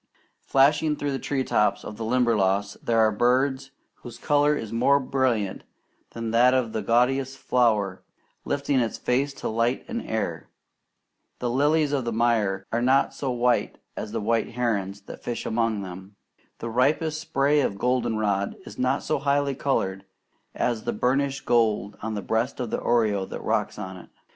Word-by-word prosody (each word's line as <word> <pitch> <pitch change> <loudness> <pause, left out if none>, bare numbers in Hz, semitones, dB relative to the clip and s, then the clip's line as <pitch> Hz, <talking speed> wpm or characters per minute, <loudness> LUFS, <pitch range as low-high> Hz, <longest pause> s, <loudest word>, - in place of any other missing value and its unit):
Flashing 150 +3 +3
through 145 -1 -2
the 135 - -2
tree 135 -2 -1
tops 105 -4 +1
of 105 - -7
the 115 - -6
Limberlost 105 -5 +1
there 115 - +2
are 110 -1 +5
birds 130 +5 +1 0.3
whose 120 - -10
colour 145 0 +2
is 110 -4 -6
more 140 +5 +4
brilliant 130 -7 -1 0.5
than 115 -1 -4
that 125 +3 +5
of 120 -4 0
the 110 - -1
gaudiest 130 +3 +1
flower 105 -8 +1 0.4
lifting 140 -1 0
its 115 -2 -1
face 135 +3 0
to - - -5
light 115 +3 0
and 235 -1 -3
air. 85 -8 -3 0.9
The 120 -1 -2
lilies 145 +3 +2
of 135 -4 -1
the 120 - -1
mire 110 -4 +1
are 115 - 0
not 130 +3 +3
so 135 - -3
white 125 -1 +1 0.2
as - - -5
the - - -2
white 115 +2 0
herons 105 -5 -1
that - - -11
fish 120 - -4
among 110 -2 0
them. 95 +2 -9 0.4
The 115 - -5
ripest 155 +6 +1
spray 145 -2 +2
of 100 -7 -1
goldenrod 110 -5 0
is 105 - -11
not 130 +2 +1
so 155 - 0
highly 140 0 +1
coloured 100 -9 -1 0.5
as 115 -3 -1
the - - -2
burnished 135 +4 0
gold 110 -3 +1
on 110 0 -3
the 100 - -4
breast 115 +5 -1
of 120 -3 -3
the - - -1
oriole 105 -5 +1
that - - -7
rocks - - -1
on 95 0 -6
it. 90 - -13
120 Hz, 170 wpm, -25 LUFS, 110-135 Hz, 0.9 s, are